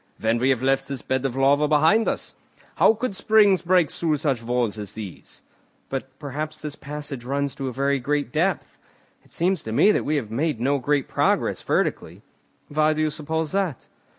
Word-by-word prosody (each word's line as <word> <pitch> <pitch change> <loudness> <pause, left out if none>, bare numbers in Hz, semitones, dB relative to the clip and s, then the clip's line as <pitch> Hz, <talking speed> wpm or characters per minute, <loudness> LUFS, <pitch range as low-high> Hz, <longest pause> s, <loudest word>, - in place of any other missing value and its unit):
"When 115 +1 +1
we 130 +2 +2
have 130 -2 +1
left 135 0 +1
this 140 -3 -5
bed 130 0 -1
of 130 -2 -2
lava 140 +2 +3
behind 160 +9 +4
us. - - -3 0.4
How 225 - +5
could 225 -2 -3
springs 205 -1 +4
break 175 -3 +3
through 160 -3 0
such 140 -5 -1
walls 120 -2 -1
as 105 -2 -6
these?" 105 -5 -9 0.5
"But 135 0 -5
perhaps 150 +2 -5
this 150 -1 -6
passage 145 -3 -7
runs 140 +2 -2
to 135 - -5
a - - -2
very 140 +2 0
great 145 +2 -1
depth. 170 +3 -1 0.4
It - - -24
seems 180 0 0
to 110 - -6
me 200 - +5
that - - 0
we 155 - 0
have 115 -7 -3
made 145 +1 -1
no 140 +4 +1
great 140 +1 0
progress - - +1
vertically." - - -1 0.4
"Why 155 +1 +2
do 155 - -2
you 155 -1 +1
suppose 160 +1 -3
that?" 190 -9 -2
145 Hz, 195 wpm, -24 LUFS, 130-155 Hz, 0.5 s, How